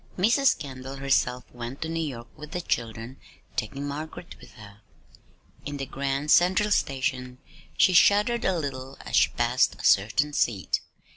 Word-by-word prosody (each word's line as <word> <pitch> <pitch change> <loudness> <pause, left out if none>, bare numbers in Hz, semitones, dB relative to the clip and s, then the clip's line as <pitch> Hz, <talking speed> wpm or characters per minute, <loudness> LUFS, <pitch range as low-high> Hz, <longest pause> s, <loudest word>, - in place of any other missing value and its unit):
Mrs. 235 +8 +3
Kendall 135 -3 -8
herself 130 -2 0
went 120 +4 -6
to - - -4
New 165 0 -2
York 120 -7 -5
with 150 -1 -10
the 180 - -2
children, 115 -2 -3 0.4
taking 140 +6 -3
Margaret 155 +4 -7
with - - -15
her. 105 -2 -14 0.8
In 145 0 -5
the 135 - -4
Grand 140 +2 -2
Central 190 +4 +4
Station 130 -5 -1 0.4
she 185 - +5
shuddered 210 +6 +4
a 190 -2 +1
little 135 -3 -5
as - - -4
she - - +5
passed - - +1
a - - -6
certain 115 +9 +3
seat. 105 -9 0
140 Hz, 155 wpm, -26 LUFS, 125-165 Hz, 0.8 s, she